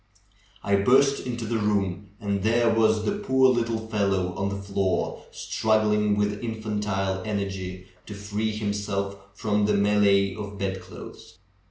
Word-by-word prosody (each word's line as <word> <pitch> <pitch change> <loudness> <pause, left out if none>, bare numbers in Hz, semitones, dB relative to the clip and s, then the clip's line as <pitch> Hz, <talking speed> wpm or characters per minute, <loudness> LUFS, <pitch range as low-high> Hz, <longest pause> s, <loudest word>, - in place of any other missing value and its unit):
I 100 0 +2
burst 135 +7 +3
into 120 -2 -3
the 115 +1 -1
room 100 -2 -1
and 100 -2 -2
there 115 +2 +3
was 110 -1 +2
the 205 - -1
poor 130 -10 +4
little 115 -2 0
fellow 100 -4 0
on 100 +2 -2
the 100 - -3
floor, 100 -1 -2
strug 110 0 +1
gling 105 -1 +2
with 105 0 0
infantile 105 -4 -2
energy 95 -3 -4 0.2
to 105 - -7
free 105 +2 -2
himself 100 -2 -2 0.2
from 105 0 +1
the 105 - +2
melee 100 -1 +3
of 105 -1 -7
bedclothes. 95 -1 -7
105 Hz, 145 wpm, -25 LUFS, 100-110 Hz, 0.2 s, poor